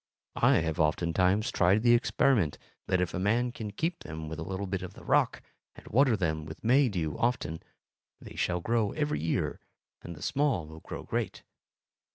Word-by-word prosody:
I - - +6
have 80 -1 -2
oftentimes 90 +6 +2
tried 95 +5 +3
the 120 -1 +6
experiment 120 - +2 0.3
that 90 - +2
if 90 - -1
a - - -2
man 115 +6 +1
keep 120 - -3
them 80 0 -7
with 80 +1 -6
a - - -3
little 95 +3 -4 0.2
of 90 - -8
the - - -13
rock, - - +2 0.3
and - - -14
water 125 -1 +4
them 80 -4 -1
with 75 - -10
May 130 +3 +4
dew 85 -7 -2
often, 115 -10 -1 0.6
they - - -11
shall 90 -1 0
grow 115 0 0
every 150 -1 -1
year 80 0 -1 0.4
and 85 - -8
the 75 - -10
small 140 - +1
will 80 +1 -11
grow - - -7
great. - - -3
95 Hz, 180 wpm, -29 LUFS, 80-120 Hz, 0.6 s, I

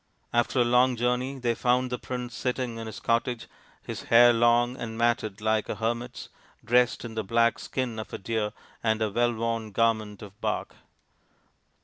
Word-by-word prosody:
After 120 +2 +2
a - - +4
long 125 +1 +4
journey 125 +3 -1
they 120 -2 0
found 125 +2 +1
the 125 - -2
prince 125 -1 -5
sitting 125 -2 -2
in 115 - -6
his 110 - -7
cottage, 115 0 0 0.4
his - - -6
hair 120 +1 +7
long 120 +1 +3
and 115 -3 -6
matted 115 -3 0
like 110 0 +1
a - - -2
hermit's, 120 +2 -3 0.4
dressed 125 +1 +2
in 115 - -7
the 110 0 -2
black 115 +3 +2
skin 125 -4 -3
of 110 - -5
the - - -6
deer 105 +1 -2 0.3
and 110 -1 +1
a 105 - -1
well 120 +3 +2
worn 115 -1 -2
garment 110 -1 0
of 105 +1 -13
bark. - - -2
115 Hz, 175 wpm, -27 LUFS, 110-125 Hz, 0.4 s, hair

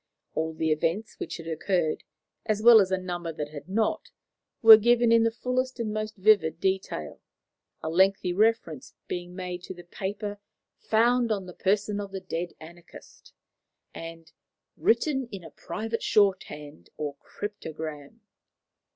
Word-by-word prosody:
All 160 0 -2
the 160 0 0
events 165 +8 -1
which - - -5
had 165 - -10
occurred, 165 0 -1 0.4
as 215 -2 +1
well 230 -2 +9
as 190 - 0
a 190 - +1
number 175 -2 -4
that 150 -2 -5
had 150 +2 -10
not, 215 +3 0 0.5
were 225 -1 +12
given 235 +2 +3
in 230 0 +6
the 230 - +3
fullest 255 +2 -2
and 215 -2 -2
most 215 0 -3
vivid 190 -5 +3
detail, 190 - -2 0.6
a 160 - -2
lengthy 190 +1 +3
reference 205 - 0
being 175 0 -5
made 180 -1 -5
to 185 - -8
the 175 - -11
paper 205 +3 -5 0.4
"found 235 +1 +2
on 200 -3 -1
the 180 - -10
person 205 +2 0
of 200 -1 -6
the 195 - -4
dead 175 -1 -4
anarchist," 170 +2 -14 0.6
and 165 0 -9 0.4
"written 265 +2 +1
in 195 -3 -7
a 165 - -11
private 225 +7 -4
shorthand 150 - 0
or 150 -2 -3
cryptogram." 155 -8 -7
190 Hz, 150 wpm, -27 LUFS, 165-215 Hz, 0.6 s, were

